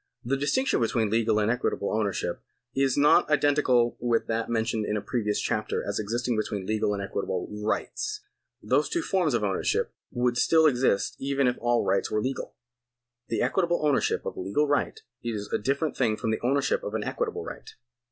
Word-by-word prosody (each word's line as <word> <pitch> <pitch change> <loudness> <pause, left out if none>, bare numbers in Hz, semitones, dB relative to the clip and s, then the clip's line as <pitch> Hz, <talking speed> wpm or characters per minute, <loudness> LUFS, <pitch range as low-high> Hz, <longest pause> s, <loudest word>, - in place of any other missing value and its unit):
The 135 +3 +1
distinction 205 - +1
between 115 -2 +1
legal 110 -1 +2
and 105 +1 +2
equitable 125 -4 -1
ownership 100 -5 -1 0.3
is 135 -1 +2
not 145 +1 +5
identical 145 -5 +3
with 120 -1 +1
that 115 0 -2
mentioned 115 -1 0
in 105 - 0
a - - 0
previous 105 -1 -1
chapter 110 - -1
as 100 - -1
existing 120 +3 -1
between 105 -3 -2
legal 105 0 0
and 100 - -4
equitable 95 -2 -3 0.2
rights. 425 - -2 0.4
These - - +2
two 345 -2 -1
forms 180 - +1
of 115 - 0
ownership 100 -2 0 0.2
would 120 0 0
still 160 +4 +4
exist 125 -8 +2
even 140 0 0
if 125 0 +2
all 120 0 +1
rights 100 - +1
were 110 - 0
legal. 130 +4 -4 0.7
The 115 - 0
equitable 170 +4 +1
ownership 145 -2 +1
of - - -4
a - - -7
legal 100 +11 0
right 145 - 0 0.2
is 110 -3 -4
a - - +2
different 140 +6 -1
thing 110 -5 +1
from 110 - -1
the 110 - -2
ownership 135 +3 +1
of 105 - -4
an 110 - -1
equitable - - -3
right. - - -8
120 Hz, 185 wpm, -27 LUFS, 105-140 Hz, 0.7 s, not